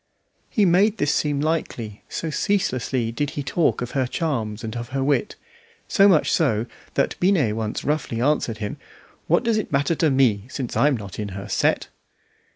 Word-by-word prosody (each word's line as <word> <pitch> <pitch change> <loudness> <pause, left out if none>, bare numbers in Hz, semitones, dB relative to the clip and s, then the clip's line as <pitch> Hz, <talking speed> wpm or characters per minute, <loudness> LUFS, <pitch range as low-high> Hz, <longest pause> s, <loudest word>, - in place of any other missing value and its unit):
He 210 - +2
made 195 +5 +4
this 145 0 +1
seem 145 -2 0
likely, 125 -9 -2
so 165 - -3
ceaselessly 130 - 0
did 145 +5 -2
he 145 - -1
talk 155 -2 +1
of 120 - -6
her 130 -2 0
charms 120 -9 -2
and 110 0 -5
of 120 0 -5
her 135 0 -1
wit; 145 +8 0 0.5
so 200 0 +5
much 175 -6 +4
so, 115 -9 +2 0.3
that - - +1
Binet 170 - +2
once 110 -1 -3
roughly 145 -6 -1
answered 125 -4 +1
him 105 -1 -4 0.5
"What - - +3
does 230 -2 +2
it 215 - -5
matter 140 +3 +2
to 160 -1 +2
me 125 -7 +2
since 130 -2 -4
I'm 145 -2 +3
not 100 -2 -8
in 105 -1 -3
her 100 +1 -6
set?" - - +1
135 Hz, 180 wpm, -23 LUFS, 115-160 Hz, 0.5 s, so